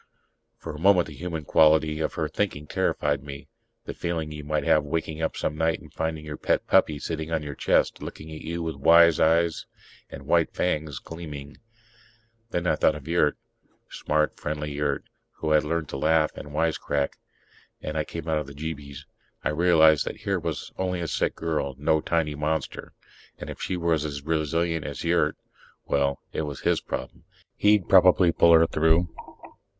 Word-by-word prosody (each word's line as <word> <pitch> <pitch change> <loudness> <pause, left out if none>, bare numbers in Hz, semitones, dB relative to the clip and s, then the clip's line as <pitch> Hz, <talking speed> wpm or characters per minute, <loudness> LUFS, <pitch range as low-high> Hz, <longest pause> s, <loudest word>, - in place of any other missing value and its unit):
For - - -7
a 75 - -8
moment 90 0 +5
the - - -10
human 85 -3 -5
quality 80 0 +4
of 80 - -2
her 80 - -1
thinking 75 -3 -2
terrified 75 -1 0
me... 70 -1 -9 0.4
the - - -5
feeling 80 -3 -3
you 75 -1 -7
might 75 +1 -1
have 75 - +3
waking 80 +1 -3
up 80 - -2
some 75 - -2
night 80 +1 0
and - - -16
finding 80 -1 -3
your 75 -1 -6
pet - - 0
puppy 75 - +3
sitting 80 +1 -4
on 80 -2 0
your 75 -1 -5
chest, - - +1
looking 80 +1 -8
at 80 - -8
you 85 +1 -4
with 80 -3 -4
wise 85 +3 +6
eyes 85 +1 +2 0.4
and 70 0 -10
white 85 +2 +2
fangs 75 -5 -1
gleaming... 75 -4 -9 0.9
Then 85 -5 -2
I 75 - +2
thought 75 - +3
of 75 -1 -10
Yurt 80 -3 +2 0.5
smart, 75 0 0
friendly 75 0 -3
Yurt, 70 -1 -1 0.3
who 80 - -3
had 75 -1 +4
learned 80 0 -2
to - - -4
laugh 80 +2 +2
and 75 - -9
wisecrack 75 -2 -1 0.6
and 75 - -5
I 75 - +1
came 75 - -7
out 80 -1 +1
of 75 - -6
the 70 - -10
jeebies. 70 -2 -7 0.4
I - - +1
realized 80 -2 +5
that - - -6
here - - -1
was - - -4
only 90 -1 -1
a 85 - -2
sick - - -1
girl, 75 -4 -2
no 75 +2 +2
tiny 80 -2 0
monster. 75 0 -3 0.4
And - - -7
if - - -10
she 95 - -2
were 85 -1 +1
as 75 -2 -2
resilient 80 +1 0
as - - -6
Yurt... - - +1 0.5
well, 70 0 0
it - - -1
was 75 -3 -5
his - - +1
problem. - - -6 0.3
He'd 105 -2 +3
probably 90 -2 +6
pull 85 0 +5
her 80 0 +7
through. 80 +2 +2
80 Hz, 185 wpm, -26 LUFS, 75-80 Hz, 0.9 s, her